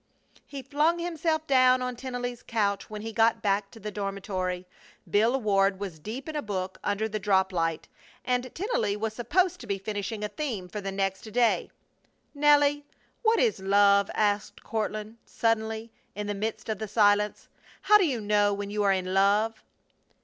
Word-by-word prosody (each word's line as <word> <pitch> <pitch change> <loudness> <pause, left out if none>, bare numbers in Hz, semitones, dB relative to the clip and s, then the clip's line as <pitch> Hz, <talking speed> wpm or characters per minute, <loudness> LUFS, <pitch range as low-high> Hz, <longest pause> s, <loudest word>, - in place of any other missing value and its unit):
He 275 -2 -7
flung 300 +6 +1
himself 325 -2 -1
down 255 -2 +4
on 250 0 -3
Tennelly's 245 -1 -5
couch 205 -3 -1
when 210 -1 -7
he 225 0 -5
got 225 +1 +2
back 200 0 +1
to 225 - -14
the 210 0 -5
dormitory. 190 -3 -3 0.4
Bill 230 +6 +2
Ward 195 -3 +2
was 190 -6 -6
deep 225 - -7
in 315 - -5
a 295 - -1
book 190 -4 -4
under 205 +2 0
the 215 0 -3
drop 190 -1 +2
light, 165 -2 -1 0.4
and 250 0 0
Tennelly 230 - -1
was 220 +1 -2
supposed 335 - +1
to 235 - -10
be 200 -1 -1
finishing 205 +2 -4
a - - 0
theme 210 -5 -4
for 205 +4 -6
the 195 0 -4
next 195 +2 -2
day. 240 +1 +2 0.6
"Nelly, 290 0 +4 0.4
what 450 -1 +3
is 460 - +2
love?" 200 +1 +4
asked 205 -1 0
Courtland, 215 0 -3
suddenly, 225 0 -1 0.2
in 210 +1 -4
the 205 - -2
midst 215 +2 -4
of 215 -3 -2
the 220 - -4
silence. 210 0 +2 0.4
"How 420 0 +6
do 385 - +3
you 255 -5 -1
know 205 -1 +2
when 200 0 -5
you 210 0 -1
are 200 -1 +3
in 185 -1 -2
love?" 210 +3 +2
215 Hz, 180 wpm, -27 LUFS, 200-245 Hz, 0.6 s, How